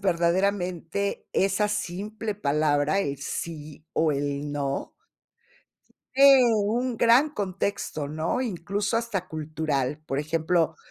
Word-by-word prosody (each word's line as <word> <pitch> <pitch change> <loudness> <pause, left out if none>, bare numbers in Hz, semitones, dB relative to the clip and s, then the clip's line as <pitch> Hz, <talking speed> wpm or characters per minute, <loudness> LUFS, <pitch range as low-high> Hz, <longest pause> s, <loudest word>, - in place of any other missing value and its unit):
verdaderamente 185 +1 0
esa 195 +2 +2
simple 210 +2 -3
palabra, 150 0 +1
el 140 -7 -2
sí 150 +1 -6
o 160 -1 +2
el 145 0 -2
no 140 -1 -2 1.2
tiene 270 -3 +7
un 230 +4 0
gran 240 +7 +5
contexto, 195 - -3
¿no? 160 - -1
Incluso 205 0 -2
hasta 210 -6 -2
cultural, 150 -3 -2
por 135 -2 -2
ejemplo 160 +1 +1
175 Hz, 105 wpm, -26 LUFS, 150-210 Hz, 1.2 s, tiene